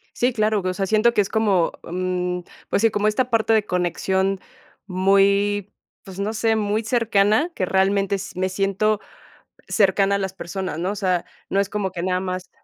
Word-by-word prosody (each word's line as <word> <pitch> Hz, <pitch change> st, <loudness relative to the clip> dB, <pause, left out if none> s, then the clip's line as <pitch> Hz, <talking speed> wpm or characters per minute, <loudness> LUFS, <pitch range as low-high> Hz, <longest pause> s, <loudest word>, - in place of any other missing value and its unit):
Sí, 245 Hz, 0 st, +1 dB
claro, 215 Hz, -2 st, +1 dB
o 185 Hz, -, 0 dB
sea, 195 Hz, +1 st, -1 dB
siento 220 Hz, +4 st, +3 dB
que 205 Hz, -, +3 dB
es 195 Hz, -, -3 dB
como, 200 Hz, -6 st, +2 dB
mm, 180 Hz, 0 st, -2 dB, 0.3 s
pues -, -, +1 dB
sí, 225 Hz, -, +5 dB
como 210 Hz, +1 st, 0 dB
esta 250 Hz, +4 st, +1 dB
parte 225 Hz, -1 st, +2 dB
de 215 Hz, -1 st, +3 dB
conexión 190 Hz, +2 st, 0 dB, 0.5 s
muy, 200 Hz, +2 st, +2 dB, 0.3 s
pues 190 Hz, -1 st, -10 dB
no 210 Hz, +2 st, -1 dB
sé, 225 Hz, 0 st, +1 dB
muy 215 Hz, +1 st, 0 dB
cercana, 225 Hz, -, +2 dB
que 185 Hz, -, 0 dB
realmente 195 Hz, +1 st, +1 dB
s 190 Hz, -, -7 dB
me 185 Hz, 0 st, 0 dB
siento 195 Hz, +2 st, 0 dB, 0.7 s
cercana 200 Hz, -1 st, +3 dB
a -, -, -1 dB
las 190 Hz, -1 st, -3 dB
personas, 185 Hz, -3 st, -5 dB
¿no? 180 Hz, +3 st, -1 dB
O 205 Hz, -, -4 dB
sea, 185 Hz, -3 st, 0 dB, 0.3 s
no 195 Hz, -, +2 dB
es 200 Hz, -, 0 dB
como 200 Hz, -2 st, -2 dB
que 170 Hz, -2 st, -5 dB
nada 185 Hz, 0 st, 0 dB
más 185 Hz, -1 st, -4 dB
195 Hz, 190 wpm, -22 LUFS, 185-215 Hz, 0.7 s, sí